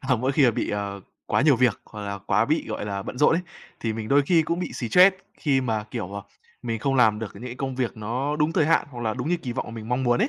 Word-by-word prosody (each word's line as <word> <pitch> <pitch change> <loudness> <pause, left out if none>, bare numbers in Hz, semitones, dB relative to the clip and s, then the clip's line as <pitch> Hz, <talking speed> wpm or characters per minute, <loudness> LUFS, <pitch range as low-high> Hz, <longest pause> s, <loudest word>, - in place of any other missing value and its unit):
à 130 -2 +1
mỗi 130 +4 0
khi 140 0 +4
mà 125 - +6
bị, - - -2
ờ, 100 -1 -3 0.3
quá - - +2
nhiều 140 -4 +5
việc 120 -4 +2
hoặc 105 - -10
là 100 0 -4
quá 100 +3 +1
bị, 155 +5 0
gọi - - -4
là, 100 -1 -3
bận 125 - -7
rộn 150 - +5
ấy, 180 - 0 0.4
thì 115 -1 -1
mình 110 0 -5
đôi 140 +1 +5
khi 165 -3 +4
cũng 170 +3 -2
bị 180 - -4
stress 180 - +5 0.2
khi 140 -4 +1
mà, 110 -4 -1
kiểu, 100 -4 -5
à, - - -8 0.4
mình 115 -2 -2
không 135 +4 0
làm 110 -5 +4
được 110 -3 -5
những 100 - -11
cái 125 -1 -5
công 135 +1 -4
việc 125 -3 -2
nó 125 +7 -2
đúng 150 +1 +1
thời 155 - +2
hạn, 165 - +3
hoặc 120 -3 -8
là 110 -2 -1
đúng 125 +4 -3
như 175 - +2
kỳ 135 -8 -5
vọng - - -3
mà - - -8
mình 110 -1 -8
mong 125 +2 0
muốn 120 -1 +2
ấy. 235 - +2
125 Hz, 305 wpm, -25 LUFS, 110-145 Hz, 0.4 s, mà